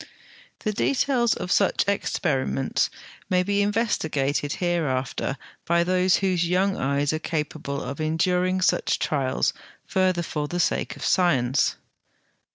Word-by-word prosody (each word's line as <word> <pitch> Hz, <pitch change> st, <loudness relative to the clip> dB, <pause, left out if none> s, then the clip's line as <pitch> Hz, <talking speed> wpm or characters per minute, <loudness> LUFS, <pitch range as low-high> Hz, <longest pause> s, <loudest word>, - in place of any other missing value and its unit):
The 215 Hz, -, -1 dB
details 250 Hz, 0 st, +1 dB
of 180 Hz, -, -5 dB
such 200 Hz, 0 st, +2 dB
experiments 140 Hz, -9 st, 0 dB, 0.4 s
may 180 Hz, -1 st, +3 dB
be 200 Hz, +2 st, +1 dB
investigated 155 Hz, -, 0 dB
hereafter 145 Hz, -6 st, -1 dB, 0.3 s
by 170 Hz, 0 st, +2 dB
those 185 Hz, +1 st, +3 dB
whose 180 Hz, -3 st, +1 dB
young 190 Hz, +2 st, +2 dB
eyes 140 Hz, +2 st, 0 dB
are 155 Hz, -, -1 dB
capable 150 Hz, -3 st, -3 dB
of 140 Hz, +4 st, -5 dB
enduring 180 Hz, +4 st, +1 dB
such -, -, +2 dB
trials 135 Hz, -3 st, 0 dB, 0.3 s
further 185 Hz, -2 st, +1 dB
for 150 Hz, -2 st, -3 dB
the 175 Hz, +3 st, -3 dB
sake -, -, 0 dB
of -, -, -6 dB
science. 135 Hz, -8 st, +2 dB
175 Hz, 125 wpm, -24 LUFS, 145-185 Hz, 0.4 s, may